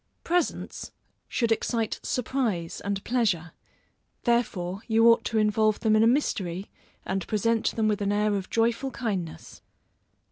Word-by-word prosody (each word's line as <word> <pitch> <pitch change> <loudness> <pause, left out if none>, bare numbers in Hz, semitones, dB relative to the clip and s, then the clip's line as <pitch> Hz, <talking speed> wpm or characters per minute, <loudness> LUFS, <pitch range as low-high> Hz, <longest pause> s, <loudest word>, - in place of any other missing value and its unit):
Presents 350 +1 -1 0.4
should 235 -2 0
excite 225 0 0
surprise 230 -9 -2
and 200 -1 -2
pleasure, 205 -9 0 0.7
therefore 200 -6 0
you 225 0 +4
ought 230 - +5
to 225 - -1
involve 215 0 +2
them 220 -2 +3
in 215 - +5
a 225 - +5
mystery, 195 - 0 0.3
and 190 -1 -2
present 225 +1 +1
them 220 -1 +1
with 210 -1 0
an 200 0 +1
air 210 0 +2
of 195 -2 -3
joyful 230 +4 +1
kindness. 195 -11 -5
215 Hz, 140 wpm, -27 LUFS, 195-230 Hz, 0.7 s, ought